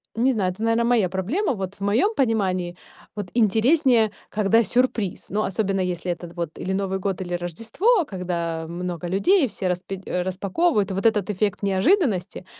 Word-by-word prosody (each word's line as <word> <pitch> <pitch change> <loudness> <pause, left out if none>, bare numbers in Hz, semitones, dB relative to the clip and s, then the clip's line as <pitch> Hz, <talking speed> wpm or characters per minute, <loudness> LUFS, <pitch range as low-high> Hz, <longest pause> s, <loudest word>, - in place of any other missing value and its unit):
не 250 +4 +3
знаю, 195 -6 0
это, 190 +4 -11
наверное, 230 +1 +2
моя 230 -7 +3
проблема. 225 - -1
Вот 195 -3 -5
в - - -20
моём 225 - +2
понимании 185 -8 0 0.4
вот 205 -3 -4
интереснее, 235 - +3 0.2
когда 215 +2 +3
сюрприз. 230 -5 0
Но 215 +2 0
особенно 195 0 -1
если 180 -1 -2
это 175 0 -6
вот 170 -3 -5
или 190 - -2
Новый 190 0 -1
год, 190 -1 -2
или 175 -1 -4
Рождество, 230 - +1
когда 170 -4 -3
много 175 0 -4
людей 280 - +3
все 190 -3 -4
распи 180 +1 -3
распаковывают, 195 - 0
и - - -2
вот 195 +3 -3
этот 210 -2 +1
эффект 205 +1 -1
неожиданности, 200 - +1
195 Hz, 165 wpm, -23 LUFS, 180-230 Hz, 0.4 s, не